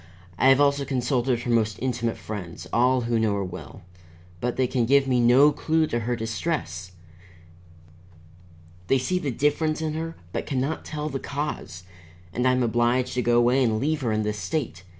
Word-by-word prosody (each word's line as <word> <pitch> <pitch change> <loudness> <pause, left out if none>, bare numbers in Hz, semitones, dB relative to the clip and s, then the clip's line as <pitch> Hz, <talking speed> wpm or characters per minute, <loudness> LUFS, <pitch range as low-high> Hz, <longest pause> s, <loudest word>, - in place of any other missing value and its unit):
I - - +4
have 135 0 +6
also 140 0 +3
consulted 125 -2 0
her 120 - -2
most 110 -2 +1
intimate 120 -2 -2
friends, 90 -5 -7
all 125 +2 +3
who 115 -1 0
know 110 -2 +1
her 100 - -1
well, 90 -2 -9 0.6
but 125 +6 -2
they 130 - +2
can 120 -2 0
give 140 +1 +4
me 125 -2 +2
no 125 +5 +6
clue 160 +1 +1
to 120 -6 -2
her 120 +2 -1
distress. 110 - -3 1.9
They 135 - +4
see 180 +9 -1
the 150 - -3
difference 150 +4 0
in 160 -1 -2
her, 165 +1 -4 0.2
but - - -3
can 135 - -1
not 140 +5 -2
tell 150 -1 -4
the 135 -2 -4
cause. 140 - -5 0.5
And 125 +4 +1
I - - +5
am 125 0 +1
obliged 120 +2 +1
to 125 - 0
go 120 0 +2
away 125 +3 +4
and 110 -3 +1
leave 150 +4 0
her 120 -4 0
in 110 0 0
this 105 0 -2
state. 115 +4 -3
125 Hz, 190 wpm, -25 LUFS, 115-140 Hz, 1.9 s, have